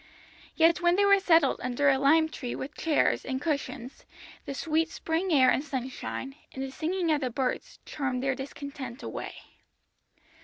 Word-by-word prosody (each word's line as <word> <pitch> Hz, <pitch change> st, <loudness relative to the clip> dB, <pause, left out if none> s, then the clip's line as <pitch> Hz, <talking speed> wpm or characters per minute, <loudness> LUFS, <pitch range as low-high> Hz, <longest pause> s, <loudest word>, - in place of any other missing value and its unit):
Yet 330 Hz, +1 st, +4 dB
when 345 Hz, 0 st, +4 dB
they 405 Hz, +1 st, +3 dB
were 400 Hz, 0 st, +6 dB
settled 330 Hz, -7 st, +4 dB
under 250 Hz, +3 st, 0 dB
a 270 Hz, -1 st, +4 dB
lime 315 Hz, +4 st, +5 dB
tree 255 Hz, -5 st, -5 dB
with 275 Hz, +3 st, -6 dB
chairs 310 Hz, 0 st, +1 dB
and 260 Hz, -1 st, -3 dB
cushions, 280 Hz, -4 st, -4 dB, 0.4 s
the 275 Hz, -, -4 dB
sweet 320 Hz, +2 st, 0 dB
spring 330 Hz, +4 st, -2 dB
air 260 Hz, -4 st, +6 dB
and 275 Hz, -, +1 dB
sunshine, 265 Hz, -1 st, -5 dB, 0.2 s
and 265 Hz, -, -4 dB
the 270 Hz, -, -5 dB
singing 335 Hz, +4 st, -1 dB
of 300 Hz, -1 st, +1 dB
the 255 Hz, -, -1 dB
birds, 255 Hz, +1 st, -3 dB
charmed 255 Hz, -3 st, -3 dB
their 270 Hz, 0 st, +1 dB
discontent 270 Hz, -1 st, -7 dB
away. -, -, -6 dB
280 Hz, 165 wpm, -28 LUFS, 265-325 Hz, 0.4 s, were